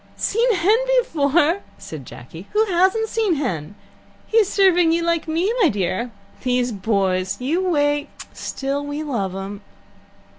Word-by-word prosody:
"Seen 475 +3 +1
Hen 380 +5 +4 0.2
before!" 330 - +2 0.2
said 155 -9 -9
Jacky. 165 +9 -11
"Who 430 +1 +3
hasn't 380 +4 +2
seen 435 -6 +1
Hen? 200 - -3 0.5
He's 440 -3 +3
serving 355 -4 +4
you 335 +1 +1
like 335 -1 0
me, 340 +7 0
my 355 - +5
dear. 200 +4 -1 0.3
These 250 -1 0
boys! 190 -3 0
You 310 +9 0
wait 290 -2 +1 0.2
Still 275 +1 -3
we 290 +1 -4
love 205 -11 -2
'em." 195 +1 -6
290 Hz, 140 wpm, -21 LUFS, -, 0.5 s, my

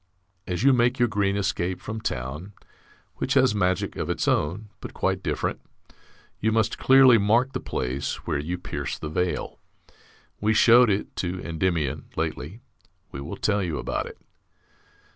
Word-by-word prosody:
As 90 +4 -2
you 135 0 +6
make 125 +1 +2
your 120 -2 +3
green 100 -2 0
escape 90 -2 -1
from 110 0 -6
town 75 +11 -4 0.6
(which - - -1
has - - +4
magic 95 -3 0
of - - -3
its - - -1
own, 95 +9 0
but - - -9
quite - - 0
different) - - -2 0.8
you 110 - +1
must 110 0 +1
clearly 130 -3 +7
mark 115 +6 +2
the 130 - -2
place 65 - -3
where 75 - -1
you 85 +5 -3
pierce 90 - -5
the - - -6
veil. 90 +2 -2 0.8
We 110 +1 +1
showed 120 +1 +7
it 100 0 -1
to 90 0 -2
Endymion 80 -4 -1
lately. 80 +6 -4 0.5
We 70 - -6
will 70 - -6
tell 105 -1 +1
you 85 -5 -2
about - - -3
it. - - -11
95 Hz, 160 wpm, -25 LUFS, 80-110 Hz, 0.8 s, clearly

